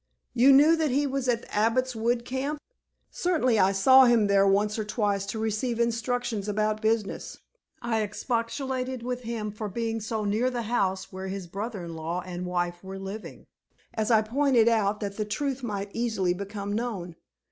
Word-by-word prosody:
"You 255 +3 +6
knew 295 +4 +7
that 315 -2 +1
he 280 +3 +1
was 270 -2 -2
at 235 -1 +1
the - - -10
Abbot's 230 +4 +1
Wood 235 +2 0
camp?" 270 +4 -3 0.5
"Certainly. 280 -11 +1
I 190 0 +5
saw 260 +7 +7
him 235 -3 +4
there 200 -1 +4
once 210 +2 +2
or - - 0
twice 205 -2 -1
to 195 - -4
receive 220 +2 -1
instructions 235 -2 -1
about 215 +1 0
business. 220 -2 -1 0.5
I 225 -2 0
expostulated 250 +4 -2
with 250 0 -3
him 225 -3 -4
for 215 0 -5
being 225 +2 -2
so 220 0 -3
near 220 +5 +1
the 245 -2 -3
house 195 -5 -1
where 190 0 -5
his 190 -1 -5
brother 200 +1 -5
in 165 -1 -7
law 165 +3 -3
and 180 0 -5
wife 175 0 -2
were 190 0 -7
living, 195 +3 -8 0.5
as 220 -1 -1
I 220 -2 +5
pointed 245 0 +3
out 215 -2 +2
that 200 -1 -4
the 215 - 0
truth 270 +5 -2
might 205 -4 -4
easily 220 -6 0
become 200 +2 -5
known. 205 -7 -3
220 Hz, 180 wpm, -27 LUFS, 200-245 Hz, 0.5 s, knew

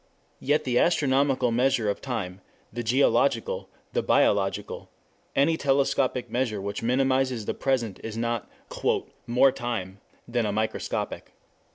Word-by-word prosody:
Yet 150 +3 +1
the 125 -2 +1
astronomical 135 -6 +2
measure 120 -2 +2
of 100 - -1
time, 100 -8 -4 0.3
the 120 - -3
geological, 140 - +1 0.2
the - - +1
biological, 480 +1 +1 0.5
any 160 +4 +3
telescopic 135 -3 +1
measure 120 -2 -1
which 100 +1 -4
minimizes 130 -1 +1
the - - -1
present 120 -7 -1
is 110 0 -5
not 115 -1 -2 0.8
"more 125 +3 +5
true" 115 -7 -4 0.3
than 120 -2 0
a - - 0
microscopic. 110 +1 -3
125 Hz, 125 wpm, -26 LUFS, 115-135 Hz, 0.8 s, more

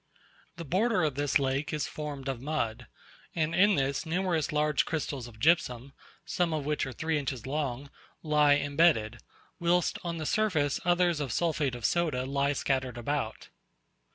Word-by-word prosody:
The 170 - -7
border 195 - +1
of 150 -3 +1
this 145 +1 +2
lake 135 +1 -1
is 150 -3 -2
formed 145 -3 -6
of 130 -3 -3
mud: 130 -6 -2 0.5
and 160 -1 0
in 205 +3 +5
this 135 -1 0
numerous 170 -2 0
large 150 -1 +2
crystals 140 -6 -3
of 110 -2 -14
gypsum, 140 -4 +2 0.3
some 175 -2 0
of 150 -2 -3
which 150 -1 -1
are - - -5
three 160 +4 -1
inches 135 -5 -4
long, 140 -1 -3 0.3
lie 150 -2 +4
embedded; 140 -6 +2 0.4
whilst 175 0 +1
on 170 -1 -3
the 155 - -4
surface 160 -9 +1
others 175 -2 +2
of 140 -4 -3
sulphate 150 -4 0
of 120 - -5
soda 155 -7 +1
lie 140 +1 +1
scattered 130 -3 -1
about. 120 -1 -3
145 Hz, 160 wpm, -29 LUFS, 135-165 Hz, 0.5 s, in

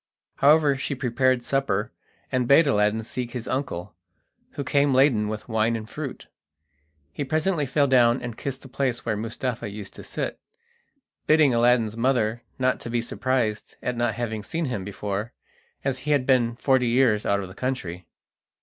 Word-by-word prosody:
However, 145 0 +5
she 135 - -3
prepared 130 0 +1
supper, 125 -5 0 0.4
and 125 -2 +1
bade 140 +5 +6
Aladdin 110 -4 +2
seek 120 +2 -5
his 120 -2 -5
uncle, 130 -12 -3 0.6
who 140 - -4
came 140 0 +2
laden 130 -6 +4
with 110 0 -5
wine 110 0 +1
and 110 -1 -5
fruit. 145 +1 -6 0.9
He 145 - -3
presently 155 +1 0
fell 145 +2 +2
down 125 -2 +4
and 120 -2 -6
kissed 135 +1 -5
the - - -10
place 125 -2 -2
where 110 -2 0
Mustapha 115 +1 -3
used 100 -1 -8
to - - -10
sit, - - -4 0.9
bidding 155 -4 +5
Aladdin's 115 -2 +3
mother 120 -2 +1 0.2
not 130 0 +1
to - - -7
be 120 0 0
surprised 120 -2 -2
at 125 - -1
not 120 -2 0
having 115 -2 -3
seen 165 +9 -3
him 120 -8 -3
before, 100 +3 -4 0.5
as 135 -2 0
he 150 - -6
had 140 -3 +3
been 120 -3 +3
forty 130 0 +2
years 115 -3 +3
out 100 0 +1
of 95 - -5
the 95 - -11
country. 95 -8 -4
125 Hz, 170 wpm, -25 LUFS, 110-135 Hz, 0.9 s, bade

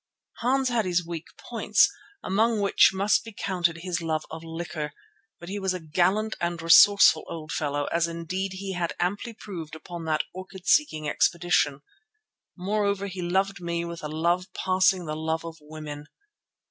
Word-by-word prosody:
Hans 260 +2 +1
had 235 -4 +1
his 175 -1 +1
weak 170 -1 -6
points, - - +3 0.4
among 220 +3 +2
which 200 -1 +5
must 200 +2 +2
be 225 - -9
counted 175 -5 -1
his 175 -2 -2
love 160 -1 -1
of 160 +1 -7
liquor, 165 -2 -5 0.5
but 170 - -10
he 200 +2 -4
was 190 -1 0
a - - -4
gallant 185 +7 +1
and 170 0 -1
resourceful 165 0 +7
old 160 -1 -6
fellow 145 -1 -1
as 170 0 +2
indeed 180 +3 -4
he 190 0 -5
had 175 -2 -2
amply 200 +7 -1
proved 165 -7 -7
upon 170 +1 -8
that 155 -1 +1
orchid 185 0 -10
seeking 215 - +3
expedition. 165 -3 +2 0.8
Moreover 200 +1 0
he 185 -2 -5
loved 190 +2 0
me 170 0 -2
with 170 0 -7
a - - -2
love 170 +4 0
passing 185 -1 +2
the 155 -1 -3
love 160 +1 -2
of 165 -1 -7
women. 150 -1 -8
175 Hz, 165 wpm, -26 LUFS, 160-195 Hz, 0.8 s, resourceful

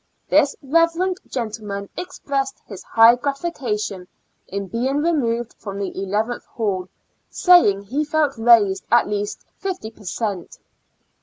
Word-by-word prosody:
This 285 - +4
Eeverencl 335 +5 +1
gentleman 210 -4 -4
expressed 275 -6 -3
his 195 -4 -9
high 225 +1 +6
gratification 245 - -3 0.4
in 200 +1 -4
being 255 +6 -1
removed 245 -7 0
from 200 -2 -6
the 200 -1 -4
eleventh 210 +5 -2
hall, 190 -5 -2 0.4
saying 340 - +5
he 265 +9 -1
felt 300 -2 +1
raised 225 -4 +4
at 240 - +5
least 205 0 -3
fifty 370 - -4
per 220 -2 -18
cent. 200 -2 -4
230 Hz, 125 wpm, -21 LUFS, 205-285 Hz, 0.4 s, high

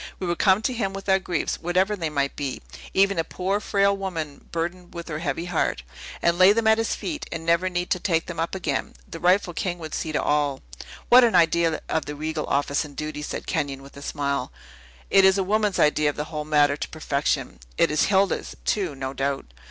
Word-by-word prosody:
We 185 - -4
would 175 -1 -2
come 195 +2 +4
to 255 - 0
him 200 -5 -2
with 195 0 -7
our 190 0 +4
griefs, 180 -2 -2
whatever 185 +4 +1
they 165 -5 -3
might 140 -2 -1
be, 140 -3 -3 0.3
even 195 -2 +3
a - - +2
poor, 190 +5 -2
frail 200 -1 +2
woman 165 -7 -5
burdened 175 +2 -4
with 170 0 -6
her 155 -1 -3
heavy 165 +1 -2
heart, 165 - -1 0.4
and 170 +1 +2
lay 185 +2 +8
them 230 +1 0
at 220 0 +5
his 225 - 0
feet, 305 -3 -5
and 165 - -5
never 170 +2 +2
need 175 0 -3
to 185 - +2
take 165 -3 0
them 170 -2 -6
up 165 +3 -1
again. 155 -7 -2
The 165 - -8
rightful 180 0 +3
king 175 +1 -2
would 160 -2 -8
see 160 - -2
to 150 - 0
all." 145 -2 0 0.5
"What 250 +1 +8
an 230 -5 +3
idea 170 -1 +3
of 160 - -1
the 145 - -5
regal 155 +1 -3
office 140 +2 +1
and 145 -2 -11
duty!" 155 +1 -4
said 150 - -5
Kenyon, 135 -1 -2
with 140 - -14
a 140 - -10
smile. 140 -2 -2 0.6
"It 195 - +6
is 190 0 +5
a 195 - +1
woman's 210 0 +1
idea 150 0 +3
of 145 - -4
the 150 - -2
whole 150 0 -3
matter 145 -2 +3
to - - -5
perfection. 145 - -2 0.2
It - - +3
is 150 - +3
Hilda's, 195 -1 +1
too, 185 -8 0
no 135 0 -4
doubt?" 135 - -3
170 Hz, 225 wpm, -24 LUFS, 150-190 Hz, 0.6 s, lay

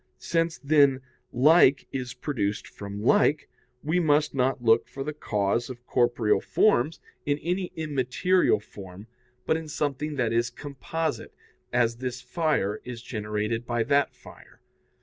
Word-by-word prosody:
Since, 165 - -1
then, 140 -2 +3 0.3
like 140 +1 +5
is 125 -2 -5
produced 105 -8 -2
from 100 0 -8
like, 145 +5 +3 0.4
we 160 +4 +1
must 150 -2 +2
not 130 -2 0
look 115 0 +4
for 135 - -6
the 150 +2 -4
cause 105 -2 -1
of 125 -1 -10
corporeal 120 -4 +2
forms 160 - +2 0.2
in 145 0 0
any 180 +4 -2
immaterial 150 - +1
form, 100 -1 -11 0.4
but 160 - +2
in 160 -1 -7
something 150 0 -2
that 120 -4 0
is 115 0 +1
composite, 155 +3 -5 0.4
as 120 -1 +1
this 125 0 -4
fire 125 - -1
is 120 -1 -8
generated 105 0 -3
by 120 -1 0
that 140 +3 +1
fire. - - -16
130 Hz, 140 wpm, -26 LUFS, 115-150 Hz, 0.4 s, like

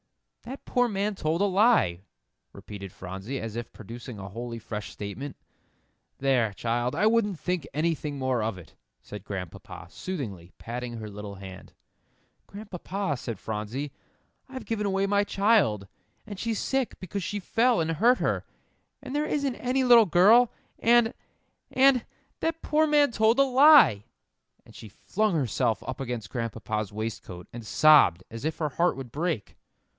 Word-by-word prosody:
"That 260 +4 -9
poor 245 0 +2
man 205 0 -1
told 165 -2 -1
a - - +4
lie," 195 - +3 0.5
repeated 100 -2 -9
Phronsie, 95 +10 -6
as 115 -1 -6
if 120 0 -5
producing 115 +2 -9
a 95 -1 -8
wholly 115 +3 -6
fresh 105 -2 -6
statement. 120 +8 -7 0.8
"There, 130 -5 +2
child, 120 +4 -1
I 210 - +2
wouldn't 215 -5 +2
think 180 -5 -2
anything 150 -1 -1
more 130 -3 0
of 110 -3 -2
it," 90 - -14 0.3
said 105 -2 -9
Grandpapa, 90 -4 -8
soothingly, 105 - -6
patting 120 +1 -6
her 110 -2 -6
little 105 0 -8
hand. 95 -1 -11 0.7
"Grandpapa," 195 -5 -4
said 115 -3 -5
Phronsie, 110 +8 -4 0.6
"I've 260 -1 -8
given 210 -2 -2
away 195 0 +1
my 200 +1 +2
child, 200 - +2 0.4
and 205 -3 -8
she's 225 0 -2
sick 265 -2 -1
because 195 +2 -5
she 205 +3 -3
fell 235 +4 +2
and 165 0 0
hurt 235 +10 +4
her, - - -1 0.6
and 260 - -6
there 300 +1 +1
isn't 280 -4 -1
any 255 +2 0
little 240 -4 +7
girl, 215 +8 +6 0.3
and 235 +1 +4 0.6
and 265 -2 +4 0.4
that 325 0 -2
poor 310 +1 +2
man 295 -3 +4
told 220 +2 +3
a 275 - +6
lie!" 265 - +6 0.6
And - - -17
she 110 - -10
flung 210 - -1
herself 120 -5 0
up 130 +1 -5
against 120 -4 -5
Grandpapa's 110 -3 -3
waistcoat, 105 -5 -6
and 120 -1 -7
sobbed 125 - +5
as 115 +2 -8
if 155 +1 -2
her 155 -2 -1
heart 170 +4 +1
would 130 -3 -8
break. 150 - -3
150 Hz, 155 wpm, -27 LUFS, -, 0.8 s, little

